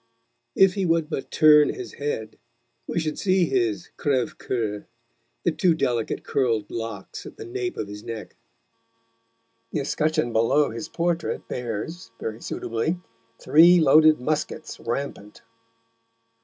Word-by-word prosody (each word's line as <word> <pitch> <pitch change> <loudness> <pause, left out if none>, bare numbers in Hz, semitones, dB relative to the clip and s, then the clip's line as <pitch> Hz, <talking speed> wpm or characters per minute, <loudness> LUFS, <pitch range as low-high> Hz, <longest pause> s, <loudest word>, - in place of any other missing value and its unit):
If 195 -1 +5
he 195 - -1
would 165 -2 +1
but 135 - -4
turn 150 -1 +6
his 380 -2 -8
head, 140 -7 -4 0.5
we - - -1
should 155 -2 -3
see 185 -2 +3
his 115 - -1
crèves 130 -4 0
coeur, 110 -4 -3 0.6
the 175 - +2
two 170 +1 +2
delicate 120 -7 -1
curled 115 -6 0
locks 115 0 -6
at - - -12
the 435 - -8
nape 370 0 -4
of - - -3
his 105 +1 -9
neck. 115 -2 -7 1.4
The - - -1
escutcheon 150 -4 0
below 115 +6 +3
his 115 +8 -6
portrait 170 -1 -2
bears, 125 - -5
very 110 +1 -5
suitably, 115 +10 -2 0.4
three 165 +6 +6
loaded 155 0 +6
muskets 155 +3 -3
rampant. 115 -4 -5
145 Hz, 130 wpm, -24 LUFS, 115-165 Hz, 1.4 s, turn